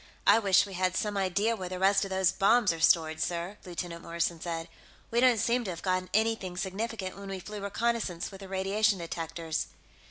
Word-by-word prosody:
"I 205 +3 +7
wish 195 -4 +4
we 200 - -9
had 185 0 0
some 210 +1 -1
idea 200 +4 +1
where 185 -4 -6
the 185 - -4
rest 195 +1 +3
of - - -6
those 190 -1 +2
bombs 210 -1 +3
are 165 - -7
stored, 160 -1 +3
sir," 175 +4 -2
Lieutenant 175 -1 -5
Morrison 170 0 -2
said. 165 -1 -4 0.4
"We 235 - +2
don't 250 -2 +5
seem 240 +3 +1
to - - -3
have 170 -2 -6
gotten 185 -1 0
anything 215 -4 0
significant 195 0 -3
when 200 0 -8
we 195 -1 -4
flew 210 +2 -7
reconnaissance 200 -3 -1
with 195 - -10
the 195 - -8
radiation 195 +2 +1
detectors." 165 -1 -4
190 Hz, 200 wpm, -29 LUFS, 175-210 Hz, 0.4 s, I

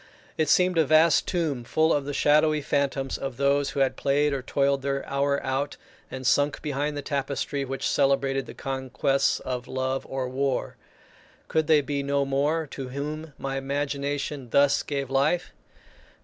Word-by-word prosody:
It 155 -2 0
seemed 180 0 +4
a - - +6
vast 155 +2 +4
tomb 155 -9 -1
full 155 +7 +2
of 145 -2 0
the 145 - -4
shadowy 150 0 +3
phantoms 140 -2 -1
of 135 -3 -5
those 140 0 +2
who 140 - -2
had 135 - +2
played 145 +1 +2
or 135 - -2
toiled 140 +1 +1
their 140 0 -2
hour 140 0 +1
out 135 +2 -2 0.3
and 130 0 -7
sunk 145 +2 +2
behind 145 0 -2
the 145 - -4
tapestry 140 0 -2
which 135 0 -3
celebrated 135 -1 +1
the - - -9
conquests 135 +1 0
of 125 -1 -4
love 130 0 -2
or 135 -1 -2
war. 135 +1 -1 0.7
Could 160 -1 0
they 155 -2 +5
be 140 0 -2
no 140 0 0
more 145 +4 0
to 135 -2 -6
whom 150 +3 -5
my 135 0 -3
imagination 140 -1 -3
thus 140 +4 +4
gave 140 -2 -4
life? 150 +6 +1
140 Hz, 165 wpm, -26 LUFS, 135-145 Hz, 0.7 s, a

